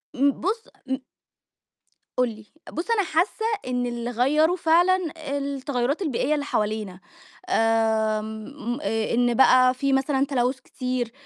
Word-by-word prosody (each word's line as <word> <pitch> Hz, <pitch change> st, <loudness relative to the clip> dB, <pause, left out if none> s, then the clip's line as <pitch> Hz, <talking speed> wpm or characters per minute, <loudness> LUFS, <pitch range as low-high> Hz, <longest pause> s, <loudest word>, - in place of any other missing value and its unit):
إمم، 280 Hz, +2 st, +4 dB
بُصّ، 435 Hz, +6 st, -2 dB, 0.2 s
م 265 Hz, 0 st, 0 dB, 1.2 s
قُل 250 Hz, 0 st, +3 dB
لي، 220 Hz, -1 st, -11 dB, 0.3 s
بُصّ 345 Hz, +8 st, -3 dB
أنا 435 Hz, -3 st, +3 dB
حاسّة 355 Hz, +7 st, 0 dB, 0.2 s
إن 250 Hz, -1 st, -1 dB
اللي 240 Hz, 0 st, -3 dB
غيّره 295 Hz, +8 st, +2 dB
فعلًا 350 Hz, +2 st, +4 dB, 0.4 s
التغيرات 280 Hz, +1 st, -2 dB
البيئية 295 Hz, -3 st, 0 dB
اللي 290 Hz, -1 st, -1 dB
حوالينا، 210 Hz, -6 st, -2 dB, 0.5 s
آمم 220 Hz, -, 0 dB
آآ 225 Hz, -6 st, -1 dB
إن 240 Hz, 0 st, +3 dB
بقى 255 Hz, +1 st, +6 dB
في 275 Hz, +2 st, 0 dB
مثلًا 270 Hz, 0 st, +2 dB
تلوث 260 Hz, -1 st, 0 dB
كتيرّ، 250 Hz, -3 st, -3 dB
255 Hz, 130 wpm, -24 LUFS, 235-295 Hz, 1.2 s, بقى